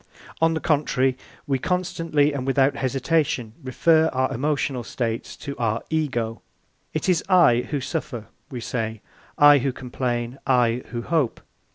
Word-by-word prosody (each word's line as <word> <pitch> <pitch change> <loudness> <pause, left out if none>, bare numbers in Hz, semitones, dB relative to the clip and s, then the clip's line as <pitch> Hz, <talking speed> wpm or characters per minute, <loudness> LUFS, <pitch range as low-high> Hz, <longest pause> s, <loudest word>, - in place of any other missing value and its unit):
On 165 0 +3
the - - -1
contrary, 135 -5 +1 0.3
we 135 -3 0
constantly 165 -4 0
and 135 -2 -4
without 135 +1 +3
hesitation 130 -3 0
refer 160 +5 +3
our 130 0 0
emotional 135 -1 -1
states 115 -1 -4
to 140 -2 -6
our 115 -1 0
Ego. 120 -8 -1 0.5
It 155 - -3
is 180 -3 +2
I 125 -10 +5
who 145 - -1
suffer, 130 -5 -4 0.2
we 125 -4 -6
say, 110 -2 -3 0.4
I 145 -1 +7
who 135 +1 0
complain, 125 0 -3
I 125 -2 +3
who 120 -1 -5
hope. 150 -4 0
135 Hz, 145 wpm, -23 LUFS, 120-150 Hz, 0.5 s, I